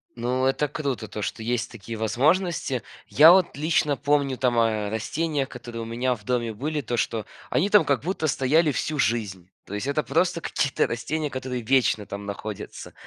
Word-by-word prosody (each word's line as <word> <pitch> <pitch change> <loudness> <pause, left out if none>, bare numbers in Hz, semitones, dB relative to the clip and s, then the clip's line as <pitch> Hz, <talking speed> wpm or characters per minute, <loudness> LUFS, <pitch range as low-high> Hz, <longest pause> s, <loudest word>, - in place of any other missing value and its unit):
Ну 125 +2 0
это 135 +3 +1
круто- 140 -6 -3
то, 105 - -6
что - - -4
есть 115 +1 -2
такие 115 0 -7
возможности. 135 - +1 0.2
Я 155 +4 +8
вот 180 -5 +3
лично 150 -1 +1
помню 140 -1 +1
там 120 -2 +2
о 110 -2 +1
растениях, 140 +5 -1
которые 120 -2 -7
у - - -5
меня 120 +3 0
в 105 -4 -10
доме 120 0 -1
были, 150 +7 -3
то, 120 -1 -3
что 110 -1 -1 0.2
они 200 - +1
там 210 -1 +6
как 140 -2 +1
будто 170 -2 -1
стояли 150 +3 +3
всю 150 +2 -2
жизнь, 105 -8 -1 0.2
то - - -9
есть 105 +6 -3
это 145 +2 0
просто 180 -1 +1
какие-то 140 -3 0
растения, 150 +6 -2
которые 130 -1 -4
вечно 115 -4 +2
там 100 0 -7
находятся. 105 0 -7
130 Hz, 185 wpm, -25 LUFS, 115-150 Hz, 0.2 s, Я